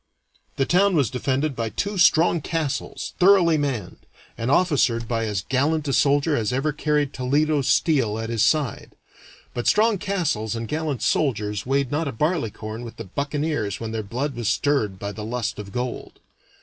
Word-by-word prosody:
The 135 - +1
town 190 +4 +3
was 140 -8 +2
defended 135 +3 -1
by 115 -2 -2
two 200 - -3
strong 170 -1 +4
castles 155 -2 -3
thoroughly 180 -3 +5
manned, 135 - -3 0.3
and 115 +2 -3
officered 140 -8 +2
by 115 -1 -1
as 100 -3 -2
gallant 150 +3 +1
a 140 - 0
soldier 145 +3 +3
as 115 -3 0
ever 135 +4 0
carried 150 -2 0
Toledo 145 +3 +1
steel 135 -4 +2
at 115 +1 -4
his 115 -2 0
side. 140 -1 +1 0.6
But 120 - -3
strong 215 -1 +3
castles 160 - -1
and 115 0 -4
gallant 150 -3 -2
soldiers 105 -7 0
weighed 135 -1 +1
not 155 +2 -1
a - - -2
barleycorn 115 - -2
with 115 - -9
the - - -6
buccaneers 140 - -2
when 115 -1 -5
their 110 -1 -2
blood 125 +8 -3
was 120 -2 -1
stirred 115 -5 0
by 100 +2 -5
the 105 +1 -7
lust 115 0 -3
of 100 -1 -8
gold. 125 +3 -4
135 Hz, 175 wpm, -23 LUFS, 115-155 Hz, 0.6 s, thoroughly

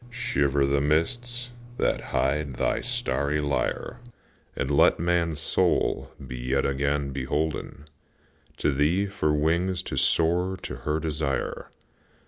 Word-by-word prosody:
Shiver 70 - +1
the 70 0 +2
mists 120 - 0 0.3
that - - 0
hide 70 0 0
thy - - 0
starry 75 - 0
lyre, 70 -1 -1 0.6
And 65 - -2
let 70 - +5
man's 85 -2 +1
soul - - +1 0.2
be 65 -1 -6
yet 65 +2 0
again 70 +1 0
beholden 75 +2 -3 0.7
To - - +1
thee 75 +8 +2
for 95 -6 0
wings 85 +5 +1
to 65 - -5
soar 85 +7 +2
to - - -5
her 75 +1 -1
desire. 75 -3 -2
75 Hz, 120 wpm, -26 LUFS, 70-85 Hz, 0.7 s, let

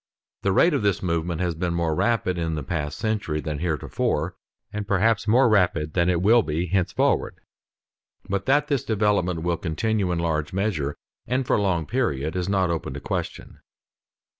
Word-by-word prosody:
The 100 - +1
rate 165 - +4
of 140 - +1
this 100 -1 0
movement 85 -1 -1
has 90 -2 0
been 85 +1 -2
more 85 -2 0
rapid 95 -1 0
in 80 -1 -1
the 75 - -4
past 75 +1 -3
century 105 -8 -1
than 75 -1 -4
theretofore, 80 0 -1 0.4
and 105 -1 -4
perhaps 105 +3 +2
more 120 +4 +5
rapid 85 -8 +2
than 85 0 +2
it 90 -1 +1
will 115 +4 +6
be 80 -1 -2
henceforward; 90 0 +1 0.9
but 100 +3 -2
that 145 +2 +3
this 140 -4 0
development 100 -6 +1
will 85 -1 0
continue 95 +4 -1
in 85 - 0
large 80 -2 -1
measure 90 -8 -1 0.3
and 130 +2 0
for - - +2
a - - 0
long 90 -5 0
period, 80 - -1
is 90 +1 -1
not 95 -3 +2
open 80 -5 -3
to - - -4
question. - - -5
90 Hz, 180 wpm, -24 LUFS, 80-105 Hz, 0.9 s, will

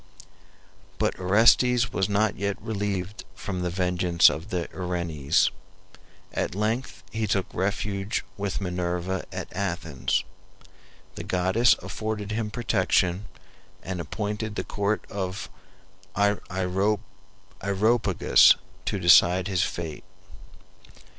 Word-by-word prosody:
But - - -1
Orestes 115 +6 +4
was 95 +1 0
not 105 +1 +2
yet 100 0 -2
relieved 100 -2 -3
from 95 -3 -4
the 90 - -1
vengeance 90 -1 +3
of 80 +7 -7
the 90 -4 -2
Erinyes. 85 -5 0 0.8
At - - -2
length 110 +5 -2
he 110 -1 -1
took 95 -1 +1
refuge 100 0 -2
with 100 -1 -3
Minerva 90 0 -2
at - - -6
Athens. 85 -8 -1 0.9
The - - -7
goddess 95 +6 +3
afforded 110 -1 -4
him 110 0 -2
protection, 100 -4 +1 0.6
and 95 -2 -4
appointed 105 +5 -4
the - - -2
court 100 +1 -1
of 95 0 -5 0.7
Areopagus 100 +1 +2 0.3
to 105 +1 -1
decide 90 +1 +6
his 95 -3 0
fate. 80 -4 -3
100 Hz, 100 wpm, -26 LUFS, 90-105 Hz, 0.9 s, decide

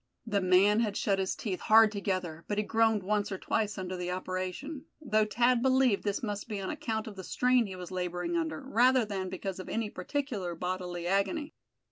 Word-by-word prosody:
The 205 -3 0
man 190 +3 +5
had 215 -3 0
shut 195 -1 +1
his 190 -1 -1
teeth 190 -5 -3
hard 220 0 +6
together, 185 -5 -3
but 205 - -2
he 210 - +2
groaned 225 -1 +2
once 205 +1 0
or 190 - -2
twice 210 +2 -1
under 185 -1 -4
the 180 0 -4
operation; 185 - -4
though 215 -8 +2
Thad 240 +3 +2
believed 260 -4 +3
this 205 +2 -2
must 205 -2 -3
be 210 -2 -3
on 190 - -3
account 225 -8 -3
of 215 - -8
the 190 - -7
strain 250 +2 +2
he 190 - -7
was 180 0 -8
laboring 180 - -2
under, 325 -3 -1
rather 255 -1 +3
than 190 -3 -3
because 190 0 -5
of 185 - -7
any 225 -2 -2
particular 200 - -3
bodily 180 0 -4
agony. 200 - 0
205 Hz, 200 wpm, -30 LUFS, 185-230 Hz, -, hard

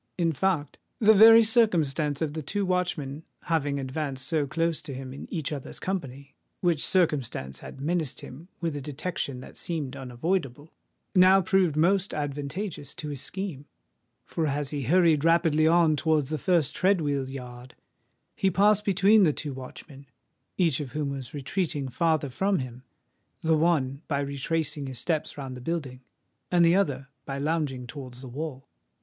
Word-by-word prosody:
In 165 -2 +1
fact, 160 -3 -1 0.2
the 220 -1 +6
very 225 +2 +9
circumstance 165 - +2
of 150 -2 -2
the 160 - -4
two 200 +7 -2
watchmen 175 -6 -1 0.2
having 145 -4 0
advanced 135 0 -3
so 155 -3 0
close 165 +2 -1
to 135 - -7
him 130 0 -7
in 140 - -10
each 160 -2 -2
other's 140 -3 -6
company,—which 155 0 -3
circumstance 130 - 0
had - - -10
menaced 160 -1 -2
him 150 +7 -11
with 165 -3 -2
a 145 - -4
detection 140 -2 -4
that - - -12
seemed 150 -6 -3
unavoidable,—now 160 +7 0
proved 190 -6 +2
most 190 +5 +2
advantageous 145 +4 -4
to 150 - -6
his 140 -3 -5
scheme; 180 -8 -5 0.6
for 160 -2 -1
as 145 0 -2
he 145 -2 -2
hurried 165 0 +4
rapidly 165 -2 +4
on 165 -2 +4
towards 150 -2 +1
the 155 - -1
first 165 -3 +1
tread 190 0 +3
wheel 140 -4 -1
yard, 125 -1 -9 0.6
he 195 - +2
passed 205 +3 +3
between 200 +2 +4
the 170 -6 +5
two 145 -1 -5
watchmen, 135 +2 -10 0.5
each 165 -7 +2
of 140 -4 -6
whom 150 -2 -1
was 135 0 -6
retreating 145 0 -2
farther 155 +1 0
from 195 +8 +1
him, 125 -1 -6 0.6
the 160 0 +3
one 150 -4 +1
by 140 -2 0
retracing 140 +1 -2
his 130 -2 -7
steps 155 +5 -2
round 135 -2 -6
the 125 - -9
building, 135 -4 -4 0.5
and 175 -1 +4
the 170 +1 +5
other 140 -8 0
by 135 0 -5
lounging 145 -4 -1
towards 125 -1 -9
the 135 - -8
wall. 135 +1 -6
150 Hz, 160 wpm, -27 LUFS, 135-175 Hz, 0.6 s, very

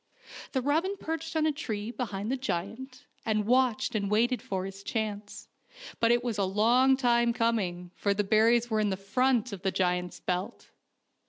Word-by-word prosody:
The 260 -2 0
robin 330 +8 +1
perched 325 -1 -5
on 315 -1 +2
a 310 - +3
tree 220 -7 -4
behind 215 -3 -4
the - - +1
giant, 255 +2 -5 0.2
and 215 -2 0
watched 250 -1 +2
and 200 -3 -1
waited 235 +4 +2
for 190 -1 -3
his 195 0 -8
chance; 210 -1 -4 0.5
but 230 - +3
it 240 0 +2
was 230 -4 -2
a - - +2
long 235 +7 +3
time 235 -2 +3
coming, 190 -7 -1
for 200 -1 +1
the 205 - +1
berries 225 +3 +3
were 220 -2 0
in 205 -2 +1
front 235 +4 +1
of 190 - -7
the 195 - +1
giant's 180 -1 -1
belt. 185 +6 -4
225 Hz, 175 wpm, -29 LUFS, 200-255 Hz, 0.5 s, a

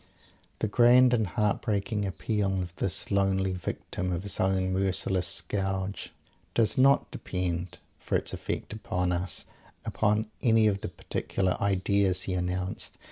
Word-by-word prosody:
The - - -1
grand 125 +3 +6
and 110 -4 +2
heart 105 +2 0
breaking 105 0 -1
appeal 95 0 -1
of 90 -1 -5
this 90 +1 0
lonely 95 -1 +2
Victim 90 0 -4
of 90 +1 -2
his 100 -1 -2
own 95 -1 +1
merciless 95 -1 +1
scourge, 95 +3 -1 0.4
does 115 -2 +3
not 135 +1 +4
depend, 90 -1 -3 0.2
for - - -2
its - - 0
effect - - -4
upon 90 -4 -2
us, 90 +1 -1 0.4
upon 110 0 +1 0.2
any 115 -4 +4
of 100 -2 +1
the - - -4
particular 95 -2 -2
"ideas" 100 -1 +2
he 95 - -2
announced. 90 +1 -3
95 Hz, 140 wpm, -28 LUFS, 90-105 Hz, 0.4 s, grand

